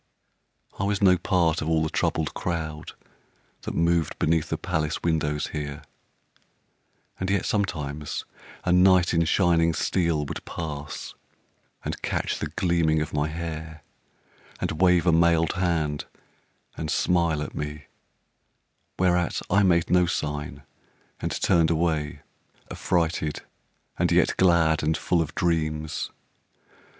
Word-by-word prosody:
I - - 0
was 100 0 0
no 95 -2 +6
part 90 -3 +1
of 80 - -2
all 80 -1 +2
the 80 - -1
troubled 80 -2 0
crowd 80 -3 -4 0.7
That - - -5
moved 85 -1 +1
beneath 80 0 +1
the - - -1
palace 75 0 -2
windows 75 -3 0
here, 75 0 -5 1.4
And 95 - -2
yet 100 0 +1
sometimes 75 -8 -2 0.4
a 90 - +1
knight 90 -1 +5
in 85 -1 +3
shining 85 -2 +3
steel 85 -5 0
Would - - -6
pass 75 -2 -6 0.7
and - - -4
catch - - -2
the - - -2
gleaming 85 -3 +1
of 75 - -3
my 75 0 +1
hair, 80 -1 -6 0.8
And 80 - -3
wave 90 -2 +4
a 90 - +5
mailed 85 0 +3
hand 80 -5 -1 0.7
and 80 - -4
smile 85 -3 +1
at 75 - -7
me, 75 0 -5 1.1
Whereat 90 -2 +1
I 100 +2 +5
made 85 -4 +3
no 90 -1 +4
sign 75 -2 -3 0.6
and - - -3
turned 85 -4 +4
away, 80 -3 0 0.5
Affrighted 80 -3 -1 0.6
and - - +2
yet - - +3
glad 85 -4 +4
and 80 +1 +1
full 85 -2 +1
of 80 - -4
dreams. 80 -2 -1
80 Hz, 130 wpm, -25 LUFS, 75-85 Hz, 1.4 s, no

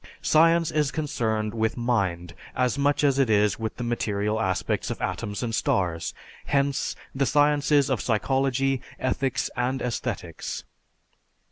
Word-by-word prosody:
Science 165 +1 +4
is 150 -2 +1
concerned 110 -8 -1
with 110 0 0
mind 95 -8 -1 0.2
as 125 -2 +1
much 145 +1 +1
as 140 -1 +3
it 135 -4 +3
is 105 -1 +3
with 110 -1 -3
the 125 - -5
material 110 -2 -1
aspects 95 -4 -1
of - - -4
atoms 105 0 -3
and 115 -2 -2
stars, 85 -6 0 0.4
hence 140 0 +1 0.2
the 135 0 +1
sciences 145 -1 +3
of 130 -5 0
psychology, 135 +3 +1 0.2
ethics, 130 0 -1
and 125 +2 0
aesthetics. 125 -2 -4
125 Hz, 135 wpm, -26 LUFS, 110-140 Hz, 0.4 s, Science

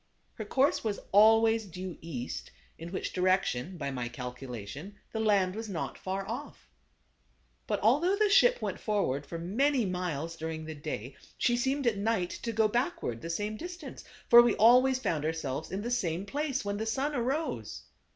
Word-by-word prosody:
Her 215 - -6
course 265 +7 +2
was 215 -3 -2
always 225 +2 +5
due 180 0 -6
east, 130 -7 -5 0.3
in 165 +1 -7
which 190 - -4
direc 185 +1 +3
tion, 150 +10 -4
by 140 -4 -3
my 125 -2 -3
calculation, 125 - -7 0.2
the 220 - -3
land 200 -4 +2
was 220 +1 -6
not 170 -5 -4
far 190 +1 -4
off. - - -7 1.0
But - - -1
although 295 - +3
the 425 +1 +3
ship - - +5
went - - -3
forward 170 - -1
for 170 - -5
many 240 - +1
miles 170 -3 -3
during 160 -1 -5
the 160 - -6
day, 145 -4 -6 0.2
she 240 - +2
seemed 265 +3 0
at 230 -4 +2
night 200 -4 0
to 230 - -2
go 220 -1 +3
backward 235 - -2
the 165 - -6
same 210 +5 -2
distance; 345 -4 -8 0.2
for 235 0 +10
we 240 -2 +3
always 250 +4 +6
found 160 - -1
ourselves 155 -2 -3
in 195 +2 -3
the 240 - -3
same 185 -6 -1
place 275 +2 -2
when 200 0 -2
the 220 +1 -3
sun 270 +7 -1
arose. 275 +5 -2
205 Hz, 180 wpm, -30 LUFS, 165-240 Hz, 1.0 s, for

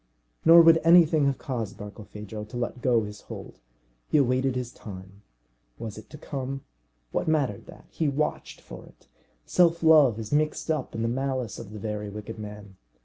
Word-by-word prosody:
Nor 165 +1 +9
would 165 0 +6
anything 165 -3 +6
have 140 - 0
caused 115 -8 -4
Barkilphedro 105 0 -8
to 110 +3 -8
let 120 +1 -3
go 120 -3 +3
his 105 0 -8
hold. - - -10 0.5
He - - +2
awaited 130 -1 +2
his 125 -1 -3
time. 95 -1 -11 0.6
Was 110 -3 -6
it 110 - -12
to 150 - -10
come? 135 -2 -5 0.5
What - - -2
mattered 145 -10 0
that? - - -14
He 155 -3 0
watched 150 +2 -3
for - - -11
it. - - -21 0.4
Self 170 -1 +3
love 150 -8 +6
is 110 -2 -6
mixed 155 +2 0
up 155 - -3
in 115 - -2
the - - +1
malice 130 -1 -2
of 105 - -9
the 105 - -8
very 105 0 -4
wicked 105 +2 -8
man. 105 -2 -9
125 Hz, 180 wpm, -26 LUFS, 105-150 Hz, 0.6 s, Nor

